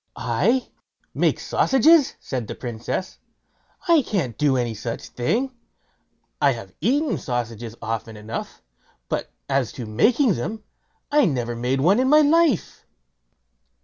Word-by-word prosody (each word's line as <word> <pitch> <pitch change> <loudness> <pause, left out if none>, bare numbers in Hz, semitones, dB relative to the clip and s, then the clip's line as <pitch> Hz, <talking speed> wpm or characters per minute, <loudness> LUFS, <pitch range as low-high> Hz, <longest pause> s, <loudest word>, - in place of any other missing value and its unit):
"I 185 - +1 0.5
make - - +1
sausages!" 290 +3 +4
said 125 -5 -4
the - - -6
Princess; 120 +9 -5 0.7
"I 335 -3 +6
can't 170 - -2
do 145 -3 +2
any 120 -2 -1
such 115 +2 -6
thing. 230 - -1 0.9
I - - +4
have - - -9
eaten 290 +4 +1
sausages 115 -2 -4
often 110 0 -4
enough; 105 - -7 0.5
but - - -2 0.2
as 135 -4 0
to 125 -4 -6
making 220 - +3
them, 210 - -4 0.5
I 295 -1 +5
never 120 - -1
made 125 +3 -1
one 190 - +4
in 260 +1 +2
my 305 +1 +7
life." 305 - +2
140 Hz, 130 wpm, -23 LUFS, -, 0.9 s, my